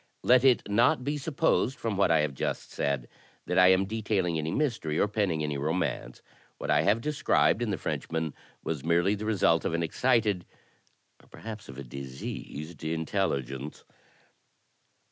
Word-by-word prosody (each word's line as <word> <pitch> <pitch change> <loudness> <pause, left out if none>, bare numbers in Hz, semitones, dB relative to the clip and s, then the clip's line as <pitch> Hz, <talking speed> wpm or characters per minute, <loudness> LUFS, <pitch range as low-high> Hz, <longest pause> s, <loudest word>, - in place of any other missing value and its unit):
Let 125 0 +5
it 130 -3 +4
not 120 +4 +3
be 145 +3 -1
supposed, 135 -2 +1
from 115 -3 -2
what 95 -1 +3
I 80 -2 +4
have 75 -2 -1
just - - -3
said, 70 -4 -1 0.4
that - - +1
I 90 - +8
am 95 +1 +4
detailing 100 -5 -1
any 80 +1 -2
mystery, 115 - -1
or - - +3
penning 100 -7 0
any 75 -2 -2
romance. 75 -5 -2 0.3
What - - -3
I 75 - +4
have 105 +8 +2
de 150 +5 -2
scribed 120 - +2
in 120 - 0
the 100 - -1
Frenchman 80 -1 -3 0.3
was 75 -5 -3
merely 85 +4 +2
the 105 +1 -4
result 90 -6 +3
of 80 - -1
an 85 - 0
excited, 105 0 +1 0.8
or - - -22
perhaps 110 -6 -9
of 65 - -9
a 70 - -6
diseased, 70 +4 -7
intelligence." 75 -5 -2
90 Hz, 165 wpm, -28 LUFS, 75-110 Hz, 0.8 s, I